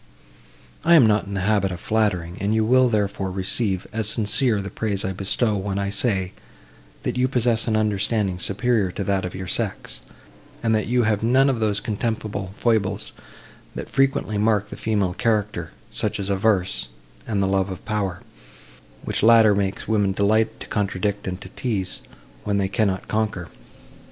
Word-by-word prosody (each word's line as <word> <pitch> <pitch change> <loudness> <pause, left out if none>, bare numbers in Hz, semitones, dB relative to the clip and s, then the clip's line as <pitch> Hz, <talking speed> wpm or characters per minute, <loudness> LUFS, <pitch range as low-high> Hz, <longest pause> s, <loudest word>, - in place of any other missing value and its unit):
I 170 +1 +6
am 145 -8 +7
not 105 -1 +2
in 100 - -5
the 95 - -1
habit 100 -1 +1
of 90 - -5
flattering, 90 -6 0
and 105 +2 +1
you 110 0 +2
will, 130 +2 +4
therefore, 100 -3 -1
receive, 95 +1 -1
as 110 -1 0
sincere, 110 +1 +2
the 95 -1 -5
praise 100 -2 -1
I 95 - -2
bestow, 105 +4 +1
when 100 0 -2
I 100 0 -1
say, 100 -3 +1 0.7
that - - -2
you 130 - +3
possess 120 -3 +1
an 110 - +1
understanding 105 -2 0
superior 105 0 0
to 100 - -3
that 95 -1 0
of 90 - -5
your 95 0 -5
sex; 85 - -2 0.6
and 115 -1 +2
that 110 -1 0
you 125 +1 +2
have 105 -2 +1
none 130 +4 +4
of 125 - -3
those 105 -2 0
contemptible 105 -3 -3
foibles, 105 -5 0 0.6
that - - -6
frequently 135 -6 +1
mark 105 -1 +1
the - - -5
female 100 -5 0
character—such 105 -5 -2
as 100 0 -2
avarice 100 -2 +1 0.4
and 105 -3 -1
the 95 - +2
love 95 0 +1
of 95 -2 -8
power, 100 -5 -2 0.8
which - - -2
latter 115 -1 +6
makes 100 -1 -2
women 105 -3 +2
delight 110 +3 +1
to - - -5
contradict 100 0 -2
and 90 0 -4
to - - -8
tease, 100 -7 -2 0.4
when 100 -1 0
they 100 -1 +1
cannot 100 -2 -1
conquer. 105 -5 -2
105 Hz, 170 wpm, -23 LUFS, 95-110 Hz, 0.8 s, am